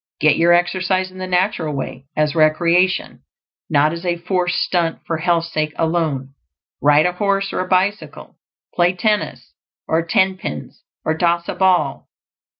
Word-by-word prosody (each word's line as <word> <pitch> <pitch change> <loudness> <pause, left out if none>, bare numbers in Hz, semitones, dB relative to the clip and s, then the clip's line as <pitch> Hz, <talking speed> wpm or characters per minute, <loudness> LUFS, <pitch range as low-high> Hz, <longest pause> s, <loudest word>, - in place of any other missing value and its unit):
Get 155 -1 +4
your 170 +1 +3
exercise 185 +1 +1
in 185 - -12
the 185 - -4
natural 180 -4 0
way; 135 0 -6
as 150 -1 +1
recreation, 170 +4 +2 0.5
not 150 0 +3
as 170 +1 -7
a 175 -1 -1
forced 180 +1 -1
stunt 170 -2 -1
for 165 - -2
health's 170 0 0
sake 155 -1 -1
alone. 160 -5 -1 0.5
Ride 150 +2 +4
a 180 - +2
horse 195 +1 -1
or - - -2
a 185 - -2
bicycle; 195 +3 -2 0.3
play 175 +1 +2
tennis 210 +3 -2 0.3
or 160 +1 +1
tenpins, 190 - -1 0.2
or 160 - +1
toss 170 0 0
a - - -2
ball. 180 -7 +1
175 Hz, 150 wpm, -19 LUFS, 155-185 Hz, 0.5 s, Get